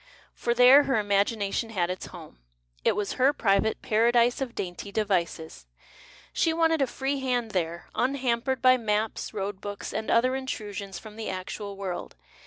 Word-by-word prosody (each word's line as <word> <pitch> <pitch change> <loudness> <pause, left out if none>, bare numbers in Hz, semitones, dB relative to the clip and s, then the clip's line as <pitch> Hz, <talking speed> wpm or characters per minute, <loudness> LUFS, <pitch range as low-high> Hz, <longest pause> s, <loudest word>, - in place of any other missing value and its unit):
For 235 0 -1
there 255 +4 +8
her 265 - +1
imagination 205 +1 0
had 180 -5 -1
its 185 - -6
home, 165 - -12 0.4
it - - +3
was 205 -1 -2
her 275 +3 +5
private 215 -3 +1
Paradise 235 +3 +3
of 245 -3 -4
Dainty 185 +2 -5
Devices; 170 - -2 0.7
she 325 - +2
wanted 325 -1 +2
a 270 - +3
free 270 +3 -2
hand 245 -4 -1
there, 170 -2 -2
unhampered 260 -1 0
by 255 0 +7
maps, 215 -1 -1
road 200 -2 -4
books, 205 0 -6
and 220 +1 -3
other 255 +3 +3
intrusions 205 -7 -5
from 215 -1 -11
the 225 - -4
actual 195 +2 -6
world. 190 -3 -5
220 Hz, 160 wpm, -27 LUFS, 195-255 Hz, 0.7 s, there